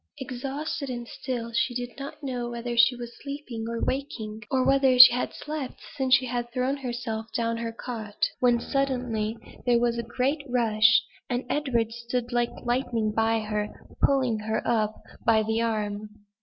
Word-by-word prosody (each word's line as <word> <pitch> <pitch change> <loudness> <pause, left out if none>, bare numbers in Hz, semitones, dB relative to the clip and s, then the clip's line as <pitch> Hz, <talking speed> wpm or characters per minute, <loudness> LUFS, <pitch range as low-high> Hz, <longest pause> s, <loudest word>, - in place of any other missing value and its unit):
Exhausted 275 +2 -4
and 240 -1 -5
still, 235 -2 -4
she 245 +1 +1
did 245 0 -3
not 275 +2 -8
know 245 -3 -3
whether 240 0 -4
she 240 +2 +6
was 240 -1 -8
sleeping 280 -6 -5
or 230 0 -3
waking; 225 -6 -3
or 260 -1 +2
whether 270 -2 +4
she 250 -1 +12
had 250 - -1
slept 300 -3 -5 0.2
since 265 -2 +4
she 260 0 +1
had 240 -1 -3
thrown 255 +2 0
herself 240 -4 -4
down 230 -1 +1
on - - -4
her 230 0 -3
cot, 225 -3 -3
when 245 -1 +4
suddenly, 245 -5 -1 0.3
there 240 -1 +5
was 235 0 +1
a 235 0 -6
great 275 +4 +1
rush, 230 -1 +4 0.3
and 245 +1 -1
then - - 0
Edward 240 -6 0
stood 240 +1 -3
like 240 0 +2 0.2
lightning 240 -3 0
by 225 0 +2
her, 210 0 -2 0.3
pulling 255 -5 +3
her 220 +1 -2
up 215 -2 0 0.2
by 220 -2 +4
the 220 +1 0
arm. 210 -2 -2
240 Hz, 175 wpm, -27 LUFS, 225-255 Hz, 0.3 s, she